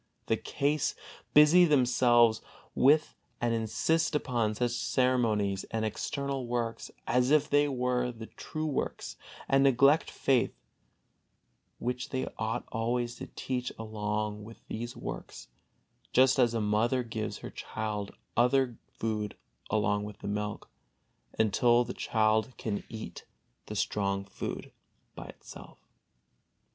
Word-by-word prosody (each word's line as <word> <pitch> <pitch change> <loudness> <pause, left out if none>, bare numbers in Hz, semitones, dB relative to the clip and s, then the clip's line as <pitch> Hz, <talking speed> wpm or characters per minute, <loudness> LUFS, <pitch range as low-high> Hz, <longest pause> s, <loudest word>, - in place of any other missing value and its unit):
the - - +2
case, 145 +1 -1 0.4
busy 150 +4 +8
themselves 125 -6 +4 0.3
with 150 +3 +4 0.3
and 120 -1 +1
insist 135 +9 +1
upon 120 -7 0
such 120 +2 0
ceremonies 115 -6 +1
and 110 -1 -2
external 135 +4 -3
works 120 -1 -2 0.2
as 125 +2 +2
if 150 0 +4
they 145 -1 +3
were 125 -2 0
the 115 -2 -9
true 155 +6 -6
works, 150 -3 -3 0.3
and 135 0 +4
neglect 140 +3 +4
faith, 130 -3 +1 1.2
which 125 +1 -3
they 130 -1 -2
ought 110 0 -1
always 120 +1 -1
to - - -7
teach 125 -1 -3
along 105 -1 -3
with 115 +2 -13
these 120 +2 -5
works, - - -7 0.6
just 130 +1 +5
as 120 -2 +3
a - - +1
mother 110 +5 +1
gives 110 -2 -4
her - - -8
child 105 -2 -4 0.3
other 125 0 +3 0.2
food 105 -2 -2 0.3
along 105 -1 +1
with 105 0 -7
the - - -8
milk, 105 0 -3 0.7
until 120 +3 +4
the 120 +1 -6
child 110 +2 +1
can 105 -3 -3
eat 110 -1 -8 0.4
the - - -6
strong 100 -1 -1
food 100 - -6 0.4
by - - -8
itself. - - -12
120 Hz, 125 wpm, -30 LUFS, 110-130 Hz, 1.2 s, busy